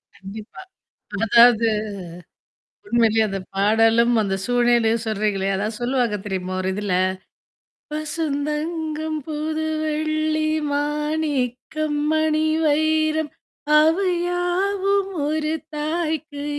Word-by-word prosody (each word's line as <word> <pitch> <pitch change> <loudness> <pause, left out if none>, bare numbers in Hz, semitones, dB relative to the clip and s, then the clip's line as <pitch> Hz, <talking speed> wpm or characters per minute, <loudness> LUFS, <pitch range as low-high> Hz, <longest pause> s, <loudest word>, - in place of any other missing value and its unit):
கண்டிப்பா. 205 - -10 0.6
அதாவது 235 0 +6 1.2
உண்மையிலேயே 225 - +3
அந்தப் 195 -1 -5
பாடலும் 225 +3 +4
அந்தச் 195 -1 -2
சூழ்நிலையும் 240 -2 +2
சொல்றீங்களே! 205 -2 -1
அதான் 210 +2 -3
சொல்லுவாங்க 240 -3 0
தெரியுமா? 185 -1 -3
ஒரு 190 - -1
இதுல, 205 -2 -2 1.0
"பசுந்தங்கம் 310 +1 -3
புது 315 +1 -3 0.2
வெள்ளி 310 0 0 0.3
மாணிக்கம் 295 -1 -1
மணி 315 0 +2 0.2
வைரம் 310 0 +1 0.5
அவை 335 +5 +3 0.2
யாவும் 385 +3 0 0.2
ஒரு 310 +1 -1 0.2
தாய்க்கு 310 -2 -3
295 Hz, 85 wpm, -22 LUFS, 225-315 Hz, 1.2 s, அதாவது